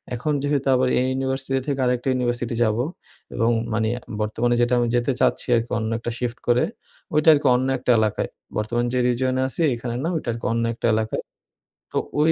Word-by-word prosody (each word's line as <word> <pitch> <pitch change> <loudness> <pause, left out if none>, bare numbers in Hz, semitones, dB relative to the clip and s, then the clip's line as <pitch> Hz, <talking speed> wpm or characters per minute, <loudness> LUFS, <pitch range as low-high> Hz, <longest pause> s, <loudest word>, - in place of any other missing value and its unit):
এখন 150 +5 -1
যেহেতু 145 -1 0
আবার 130 0 +2
এই 130 - +1
ইউনিভার্সিটি 135 0 -1
থেকে 140 -2 -1
আরেকটা 125 +1 0
ইউনিভার্সিটি 120 -2 -1
যাবো, 110 +1 +1 0.5
এবং 115 - +2 0.2
মানে 110 0 +1 0.3
বর্তমানে 115 +3 +1
যেটা 120 +1 +2
আমি 120 - +1
যেতে 120 +2 +1
চাচ্ছি - - +1
আরকি 115 0 -1
অন্য 110 -1 -2
একটা 120 - -4
শিফট 120 -1 -3
করে 120 +1 +4 0.5
ওইটা 150 +2 +5
আরকি 145 -1 +2
অন্য 130 +1 +1
একটা 125 0 +1
এলাকায়। 110 -1 0 0.3
বর্তমানে 120 +3 0
যে 125 - +2
রিজিয়নে 130 +1 +1
আছি 135 - -4
এখানে 120 0 -4
না 165 - 0
ওইটা 150 -6 -3
আর - - -5
কি - - -6
অন্য 115 0 0
একটা 120 - -1
এলাকায়। 110 0 -2 0.7
তো - - -2 0.2
ওই 155 +2 +5
120 Hz, 195 wpm, -23 LUFS, 115-130 Hz, 0.7 s, ওইটা